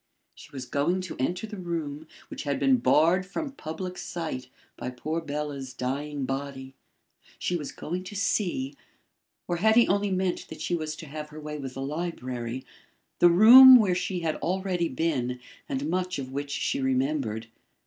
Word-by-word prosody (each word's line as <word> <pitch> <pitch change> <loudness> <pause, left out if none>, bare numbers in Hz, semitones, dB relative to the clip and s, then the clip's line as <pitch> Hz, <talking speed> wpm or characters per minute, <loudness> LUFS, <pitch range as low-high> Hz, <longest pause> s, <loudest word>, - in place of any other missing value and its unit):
She - - -14
was 130 -2 -6
going 145 +9 0
to 185 - -7
enter 175 +10 -1
the 210 -2 -8
room 160 -4 -4 0.2
which - - -6
had 140 -1 -2
been 265 -1 +4
barred 175 -4 +4
from 275 - -5
public 180 - -6
sight 155 -7 -5 0.3
by - - -5
poor 155 +6 -3
Bela's 145 -3 -5
dying 140 +2 -3
body. 135 0 -5 0.6
She 180 - -1
was 150 -4 -4
going 180 +3 -5
to 205 - -8
see 180 -9 0 0.7
or 175 - -1
had 220 +5 +4
he 235 0 +6
only 200 +1 +1
meant 185 -1 -1
that - - -9
she - - -2
was 155 -2 -2
to 160 - -9
have 150 +1 -7
her 155 +1 -10
way 150 0 -6
with 135 -2 -6
the 135 - -4
library 130 -5 -4 0.5
the 175 - +7
room 245 +9 +10
where 210 -7 +5
she 180 0 -2
had 160 -2 -1
already 180 -2 -1
been 130 -4 -1 0.3
and 135 +2 -2
much 180 +2 -1
of 130 -2 -6
which 140 +1 -4
she 140 - -1
remembered. 130 -4 0
155 Hz, 175 wpm, -27 LUFS, 135-180 Hz, 0.7 s, room